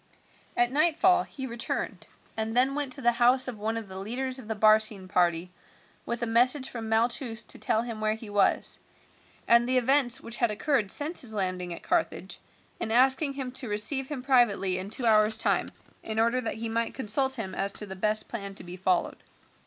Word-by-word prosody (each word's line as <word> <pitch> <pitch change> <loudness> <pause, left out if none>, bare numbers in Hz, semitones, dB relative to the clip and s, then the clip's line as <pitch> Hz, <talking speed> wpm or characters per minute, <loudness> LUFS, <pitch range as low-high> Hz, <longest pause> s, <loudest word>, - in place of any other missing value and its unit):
At 240 0 +3
nightfall 345 +5 +3
he 265 -6 -7
returned, 235 -2 -4 0.3
and 220 +1 -3
then 260 +2 +3
went 285 -2 -3
to 275 - -2
the 240 - +5
house 245 +2 +3
of 235 -4 -6
one 220 +2 -2
of 225 -2 -6
the 190 0 -8
leaders 255 +6 -3
of 235 - -11
the 220 - -3
Barcine 215 -2 +3
party 175 -1 +1 0.6
with 235 0 -3
a - - +2
message 250 +4 +2
from 225 -2 -6
Malchus 230 +1 0
to - - -7
tell 220 - +1
him 230 -3 -6
where 215 0 +1
he 220 0 -10
was, 205 -1 +1 0.7
and 235 +1 +4
the 255 - +3
events 255 -1 +2
which 235 +1 -8
had 235 - +2
occurred 215 0 0
since 300 - -3
his 220 -4 -6
landing 185 -3 -2
at 170 - -7
Carthage, - - -2 0.4
and 220 - -2
asking 265 +4 +3
him 265 -2 -5
to 255 -2 -7
receive 215 +6 -1
him 270 -4 -6
privately 235 -8 +2
in 190 +2 -5
two 240 +3 -4
hours' 215 -1 +4
time, - - 0 0.3
in 220 0 -5
order 235 +3 +2
that 225 - -3
he 230 +1 -4
might 230 +1 -2
consult 265 +2 +2
him 200 -6 -5
as 195 +1 0
to 210 - 0
the 190 -1 -8
best 215 +3 +1
plan 200 -4 -6
to - - -8
be 175 +1 -8
followed. 185 -1 0
230 Hz, 205 wpm, -28 LUFS, 210-255 Hz, 0.7 s, the